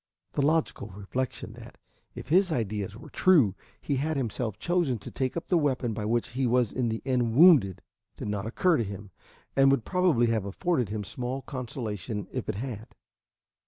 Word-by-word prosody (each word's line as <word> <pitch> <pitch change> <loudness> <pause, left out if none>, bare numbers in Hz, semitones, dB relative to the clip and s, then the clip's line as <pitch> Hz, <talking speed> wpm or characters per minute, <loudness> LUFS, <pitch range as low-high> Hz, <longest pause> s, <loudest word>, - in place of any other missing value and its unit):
The - - -1
logical 155 -6 +1
reflection 105 +6 -4
that, - - -12 0.4
if - - -8
his 180 +2 +4
ideas 105 -6 -2
were - - -12
true, 150 - +4 0.3
he 140 - -1
had 155 +3 -1
himself 115 -4 -2
chosen 170 -3 0
to - - -10
take 130 +3 -2
up 170 - -4
the 175 - +2
weapon 130 -6 0
by 105 0 -4
which 115 +2 0
he 130 +1 -1
was 120 -2 +2
in 125 -3 -1
the 110 0 -3
end 125 -4 +1
wounded, 145 - +6 0.3
did - - -5
not 105 0 -2
occur 170 +9 +2
to 115 - +1
him, 100 -1 -8 0.4
and 135 0 +6
would 135 -5 +2
probably 180 -10 +3
have 115 -4 0
afforded 125 - -1
him 105 0 -3
small 125 +5 -4
consolation 110 - -5
if 125 -4 -4
it 110 - -1
had. 110 -1 -6
125 Hz, 185 wpm, -28 LUFS, 105-140 Hz, 0.4 s, wounded